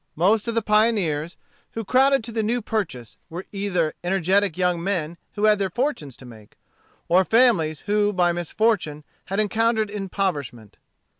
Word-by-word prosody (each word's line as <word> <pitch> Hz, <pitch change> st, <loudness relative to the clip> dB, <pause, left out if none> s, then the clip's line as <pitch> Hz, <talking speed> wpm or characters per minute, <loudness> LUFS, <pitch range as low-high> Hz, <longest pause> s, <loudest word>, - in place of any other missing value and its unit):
Most 205 Hz, +7 st, +2 dB
of 230 Hz, -, -2 dB
the 230 Hz, -, +1 dB
pioneers 200 Hz, -8 st, +1 dB, 0.4 s
who 225 Hz, -1 st, -5 dB
crowded 270 Hz, +3 st, +3 dB
to 230 Hz, -, -7 dB
the 225 Hz, 0 st, -1 dB
New 230 Hz, +3 st, 0 dB
Purchase 125 Hz, -, -4 dB
were 175 Hz, +3 st, -7 dB
either 190 Hz, -6 st, -1 dB
energetic 190 Hz, 0 st, +1 dB
young 180 Hz, -2 st, 0 dB
men 170 Hz, -4 st, -2 dB, 0.2 s
who 205 Hz, -, -4 dB
had 215 Hz, -1 st, +4 dB
their 195 Hz, -1 st, 0 dB
fortunes 210 Hz, -, -3 dB
to 130 Hz, -, -14 dB
make, 110 Hz, -4 st, -15 dB, 0.5 s
or 185 Hz, +2 st, +4 dB
families 190 Hz, -, +3 dB
who 205 Hz, 0 st, +1 dB
by 180 Hz, -3 st, +2 dB
misfortune 175 Hz, -3 st, -1 dB, 0.2 s
had 195 Hz, +2 st, -3 dB
encountered 220 Hz, 0 st, +1 dB
impoverishment. 180 Hz, -, -4 dB
195 Hz, 155 wpm, -23 LUFS, 165-220 Hz, 0.5 s, had